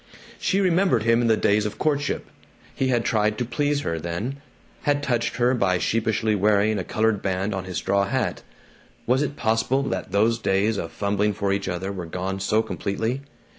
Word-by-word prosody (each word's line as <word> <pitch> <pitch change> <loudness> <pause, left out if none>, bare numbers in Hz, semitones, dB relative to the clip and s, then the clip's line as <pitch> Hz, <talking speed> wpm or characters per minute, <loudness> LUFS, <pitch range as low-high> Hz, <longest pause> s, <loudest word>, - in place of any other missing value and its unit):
She 195 - +1
remembered 180 - +3
him 115 +1 +3
in 120 - +2
the 110 -1 +4
days 105 +1 +2
of 105 - -7
courtship. 145 -2 0 0.5
He 135 - 0
had 120 -3 +1
tried 105 -1 +1
to 125 - -1
please 145 +4 0
her, 85 -10 -2
then, 85 - -4 0.4
had 145 0 +1
touched 120 -4 0
her 125 +1 +3
by 95 -7 +2
sheepishly 110 +2 0
wearing 105 +1 +2
a - - -2
colored 110 +1 0
band 95 +2 -1
on 95 -1 -4
his 90 -3 -4
straw 100 0 +1
hat. 100 - -1 0.6
Was 130 +3 +2
it 145 -1 -2
possible 115 +4 +1
that 95 -7 -3
those 110 +4 +2
days 100 +1 +1
of 80 - -4
fumbling 105 +1 0
for 100 0 0
each 100 -1 -2
other 95 +2 -3
were 90 -4 -6
gone 95 +3 -3
so 105 +3 +2
completely? 115 +7 -2
110 Hz, 190 wpm, -24 LUFS, 100-120 Hz, 0.6 s, the